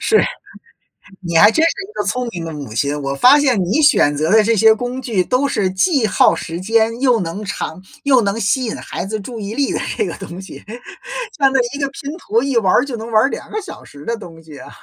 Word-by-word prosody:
是。 435 - +3 1.0
你 170 -3 -1
还 205 +4 +7
真 315 +8 +2
是 330 - +3
一 395 - -12
个 - - -2
聪 250 -1 -2
明 170 -2 -6
的 160 - -6
母 140 -7 -8
亲， 145 +4 -1
我 140 0 -3
发 255 - +6
现 260 -8 +2
你 215 - +1
选 275 - +4
择 155 +3 -1
的 220 -1 +6
这 230 +1 +2
些 220 +2 +6
工 245 +3 -4
具 215 -8 0
都 255 +8 +1
是 195 -8 0
既 230 - +2
耗 200 - +3
时 165 +1 -6
间 225 +3 +1
又 250 -4 +3
能 180 +5 -5
长 180 -2 -5 0.2
又 265 -3 +4
能 200 +1 -1
吸 250 +5 +1
引 220 - -3
孩 180 - -6
子 215 +2 -4
注 230 +3 -8
意 205 +1 -5
力 280 -1 0
的 - - -1 0.2
这 430 - +1
个 - - -4
东 180 -2 -8
西， 190 - -11 0.7
像 275 -2 +3
那 265 - +2 0.2
一 280 - -6
个 275 - 0
拼 280 +1 -7
图 230 -5 0
一 275 -3 0
玩 190 -5 +2
儿 - - +3
就 265 - -5
能 225 +1 -7
玩 215 0 +4
儿 - - +3
2 - - -7
个 430 - -3
小 390 - -10
时 145 0 -14
的 235 - -1
东 165 -6 -12
西 155 -3 -13
啊。 - - -11
220 Hz, 265 characters per minute, -18 LUFS, 180-260 Hz, 1.0 s, 还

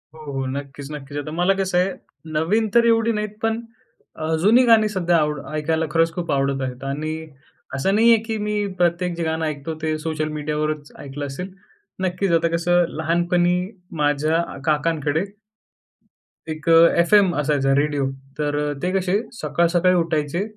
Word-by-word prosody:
हो, - - -13
हो. 135 -1 -2
नक्कीच, 140 +1 -6
नक्कीच. 145 -1 -7
आता 155 +1 -4
मला 180 +2 +3
कसंय, 190 -1 0 0.4
नवीन 210 +8 +2
तर 235 0 +6
एवढी 230 0 +3
नाहीत, 210 0 -4
पण 225 +1 0 0.6
अ, 160 +1 0
जुनी 230 +6 +6
गाणी 225 -2 +5
सध्या 175 -4 +1
आवड 150 -2 0 0.2
ऐकायला 160 +1 0
खरंच 165 +1 +2
खूप 175 0 -3
आवडत 135 -1 0
आहेत. 130 0 -5
आणि 150 +3 -3 0.6
असं 190 +10 +1
नाहीये, 230 +1 +6
की 225 -1 -2
मी 210 0 -2 0.2
प्रत्येक 175 0 +1
जे 170 - -3
गाणं 160 0 -1
ऐकतो, 150 +1 -4
ते 155 -1 -1
सोशल 155 -1 -2
मीडियावरच 150 0 -3
ऐकलं 145 +1 -6
असेल. 180 +8 -6 0.5
नक्कीच 185 +1 -1
आता 170 - +1
कसं, 175 +1 +3
लहानपणी 175 +2 +2 0.4
माझ्या 150 +2 +2
अ, 170 - -7
काकांकडे 155 +1 0 1.3
1 155 +1 -8
अ, 165 - +6 0.3
एफ-एम 190 +1 +5
असायचा 140 -2 +1
रेडियो. 145 -1 +1 0.3
तर 145 -1 0
अ, 145 0 -1
ते 180 - 0
कसे 190 0 0 0.2
सकाळ-सकाळी 170 +1 +2
उठायचे 165 +1 0
160 Hz, 160 wpm, -22 LUFS, 150-180 Hz, 1.3 s, तर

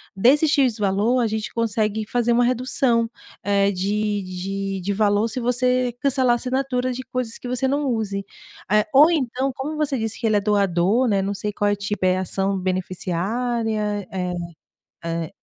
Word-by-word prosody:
desse 265 +10 +4
"X" 270 -6 +2
valor, 210 +4 +1
a 235 - +2
gente 220 0 -3
consegue 220 -2 0
fazer 240 0 +1
uma 240 +1 +4
redução, 245 -1 +1 0.3
eh, 200 0 +2
de 205 +2 -1
de 195 +1 -4
de 200 +3 -1
valor. 205 +1 +2
Se 240 +3 -4
você 250 0 +1
cancelar 260 -3 +3
a - - +3
assinatura 255 0 -1
de 260 - -6
coisas 250 -2 -4
que 245 - -7
você 250 +1 0
não 285 +2 0
use", 210 -5 -2 0.5
eh, 210 0 +4
ou 300 +5 +7
então, 265 -3 0
como 285 +5 -4
você 300 -3 0
disse 225 -1 -2
que 235 - -4
ele 215 -2 +3
é - - +1
doador, 200 +3 +2
né. 200 -2 +2
Não 195 +1 -2
sei 210 +1 -3
qual 205 0 0
é - - +2
o - - 0
tipo, 200 -1 -3
é 185 0 +3
ação 195 +1 -1
beneficiária? 205 +4 -2
Eh, 180 -1 -3 0.7
eh. 165 -1 -2
220 Hz, 185 wpm, -22 LUFS, 200-250 Hz, 0.7 s, ou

